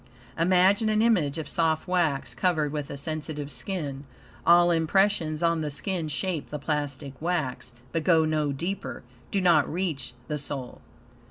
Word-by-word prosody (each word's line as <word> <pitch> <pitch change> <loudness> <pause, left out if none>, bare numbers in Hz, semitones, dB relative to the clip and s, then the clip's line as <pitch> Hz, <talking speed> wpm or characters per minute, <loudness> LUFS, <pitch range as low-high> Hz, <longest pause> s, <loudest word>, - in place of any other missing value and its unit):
Imagine 185 +5 +4
an 215 0 +3
image 175 -12 +2
of 155 -2 -4
soft 160 0 +1
wax, 170 -6 0
covered 160 -6 +1
with 150 -2 -4
a 140 - -5
sensitive 150 0 -4
skin. 145 -5 -4 0.4
All 175 0 +7
impressions 165 -1 +2
on 165 -1 +2
the 150 - -2
skin 165 +3 -2
shape 160 +1 -2
the 150 - -4
plastic 145 -2 -3
wax, 140 -8 -2 0.2
but 165 - -1
go 165 -3 +4
no 155 -2 0
deeper 140 -3 -4 0.3
do 200 - 0
not 170 -6 +4
reach 155 -8 -3
the 150 -1 -2
soul. 140 -3 -5
160 Hz, 155 wpm, -27 LUFS, 145-180 Hz, 0.4 s, All